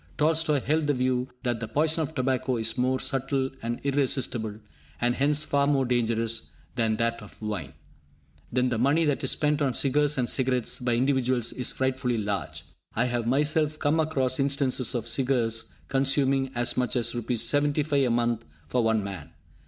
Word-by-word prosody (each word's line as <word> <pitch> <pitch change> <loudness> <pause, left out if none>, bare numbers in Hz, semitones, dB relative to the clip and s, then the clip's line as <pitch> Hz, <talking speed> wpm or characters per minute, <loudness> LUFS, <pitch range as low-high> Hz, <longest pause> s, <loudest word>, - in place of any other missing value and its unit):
Tolstoi 155 -2 +2
held 155 +3 0
the 145 - +2
view 125 0 0 0.2
that 120 -3 -1
the 115 - -4
poison 155 +5 +1
of 160 +1 -4
tobacco 130 -1 0
is 110 - 0
more 130 +1 +1
subtle 135 0 -1
and 120 +1 -3
irresistible, 130 -6 0 0.4
and 120 0 +2
hence 145 +3 +1
far 140 0 +1
more 140 -2 +2
dangerous, 115 -2 -1 0.3
than 115 -3 +1
that 115 +1 -1
of 105 - -13
wine. 105 - -4 0.8
Then 125 +1 +1
the 120 -3 -1
money 145 +7 +3
that 145 -2 0
is - - +1
spent 150 0 +1
on 135 -4 +1
cigars 145 +1 +2
and 125 -2 +1
cigarettes 125 -2 -1
by 120 -1 0
individuals 130 -2 +1
is 125 - -2
frightfully 130 -2 -1
large. 100 -2 -3 0.3
I 120 - +2
have 120 -2 -1
myself 150 +3 +1
come 155 +2 +1
across 140 -5 0
instances 135 -2 +1
of 120 -1 -3
cigars 120 -3 +1 0.2
consuming 135 0 +2
as 120 0 +2
much 125 0 0
as 120 -2 +1
Rs. 120 -1 0
75 145 +1 +2
a - - 0
month 120 -1 0 0.3
for 120 +7 +1
one 110 -2 +2
man! 90 -6 -7
130 Hz, 175 wpm, -26 LUFS, 120-140 Hz, 0.8 s, money